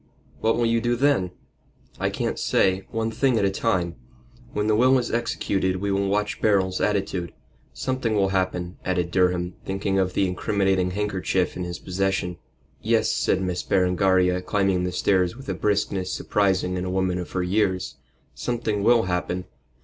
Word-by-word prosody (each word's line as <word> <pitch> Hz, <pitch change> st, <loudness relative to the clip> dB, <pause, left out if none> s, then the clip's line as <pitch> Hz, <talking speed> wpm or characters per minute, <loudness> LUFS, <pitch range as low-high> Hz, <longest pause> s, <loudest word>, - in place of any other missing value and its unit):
"What 115 Hz, +1 st, +2 dB
will 120 Hz, -, +2 dB
you 115 Hz, 0 st, +2 dB
do 120 Hz, +1 st, +1 dB
then?" 130 Hz, -8 st, +2 dB, 0.7 s
"I -, -, +1 dB
can't -, -, -2 dB
say. 95 Hz, 0 st, +1 dB
One 115 Hz, 0 st, -2 dB
thing 125 Hz, +1 st, +2 dB
at 100 Hz, -, +2 dB
a 95 Hz, -, +2 dB
time. 95 Hz, -, -1 dB, 0.5 s
When 105 Hz, -, -1 dB
the 110 Hz, 0 st, +3 dB
will 130 Hz, +4 st, +5 dB
is 120 Hz, -2 st, -2 dB
executed 100 Hz, -5 st, 0 dB
we 100 Hz, +2 st, -2 dB
will 100 Hz, 0 st, +1 dB
watch 105 Hz, +1 st, -1 dB
Beryl's 95 Hz, -3 st, +2 dB
attitude. 95 Hz, -4 st, -1 dB, 0.4 s
Something 115 Hz, -, -2 dB
will 100 Hz, -2 st, +2 dB
happen," 95 Hz, -2 st, -1 dB
added 90 Hz, -2 st, -1 dB
Durham, 90 Hz, -1 st, +1 dB
thinking 95 Hz, 0 st, -1 dB
of 95 Hz, -1 st, 0 dB
the 95 Hz, -, +2 dB
incriminating 95 Hz, 0 st, +1 dB
handkerchief 95 Hz, -2 st, -1 dB
in 90 Hz, -, -3 dB
his 85 Hz, 0 st, -5 dB
possession. 95 Hz, -1 st, -2 dB, 0.4 s
"Yes," 110 Hz, 0 st, +2 dB
said 95 Hz, -, +1 dB
Miss 90 Hz, -1 st, -1 dB
Berengaria, 90 Hz, -1 st, +2 dB
climbing 95 Hz, -2 st, +1 dB
the 90 Hz, -, -2 dB
stairs 90 Hz, 0 st, +1 dB
with 135 Hz, -, -11 dB
a -, -, 0 dB
briskness 100 Hz, -2 st, 0 dB
surprising 95 Hz, -2 st, 0 dB
in 90 Hz, -, -2 dB
a -, -, -3 dB
woman 95 Hz, -1 st, 0 dB
of 90 Hz, -, -7 dB
her 90 Hz, -, 0 dB
years, 95 Hz, 0 st, 0 dB, 0.4 s
"something 115 Hz, -4 st, -2 dB
will 115 Hz, +2 st, +4 dB
happen. 90 Hz, 0 st, -2 dB
95 Hz, 170 wpm, -24 LUFS, 90-105 Hz, 0.7 s, will